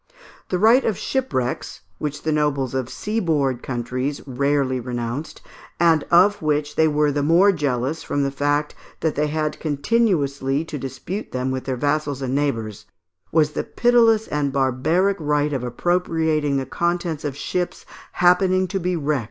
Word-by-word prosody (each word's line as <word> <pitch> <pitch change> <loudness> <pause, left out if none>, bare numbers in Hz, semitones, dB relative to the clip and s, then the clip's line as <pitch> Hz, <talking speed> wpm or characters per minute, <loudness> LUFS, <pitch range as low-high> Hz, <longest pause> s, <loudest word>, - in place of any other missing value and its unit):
The 180 - 0
right 230 +7 +5
of 215 -5 0
shipwrecks, 130 - -2 0.2
which 150 -1 -4
the 155 - 0
nobles 145 -4 0
of 130 -2 -2
seaboard 155 - -1
countries 130 +3 -3
rarely 140 0 0
renounced, 120 +4 -5 0.4
and 165 -3 +4
of 195 +4 +5
which 150 -1 -1
they 160 - +4
were 150 -1 +2
the 145 0 -1
more 170 +7 +5
jealous 145 -2 -1
from 145 - -1
the 140 - -1
fact 145 +1 0 0.3
that 160 - +1
they 150 +1 0
had 155 0 -2
continually 145 - 0
to 150 -3 -6
dispute 135 - -6
them 130 +1 -1
with 130 0 -4
their 130 -2 -2
vassals 145 0 -1
and 130 0 -2
neighbours, 115 -7 -2 0.4
was 155 -2 +3
the - - -2
pitiless 230 -2 +3
and 145 -2 -1
barbaric 140 +9 +1
right 150 -1 0
of 130 -3 -2
appropriating 160 +1 0
the 135 - -2
contents 170 +2 -2
of 145 -2 -4
ships 180 +4 -3 0.3
happening 185 +1 +3
to 195 - -1
be 180 0 -1
wrecked - - -1
on 150 - -6
their 150 - +2
shores. 145 - +1
150 Hz, 170 wpm, -22 LUFS, 135-170 Hz, 0.4 s, right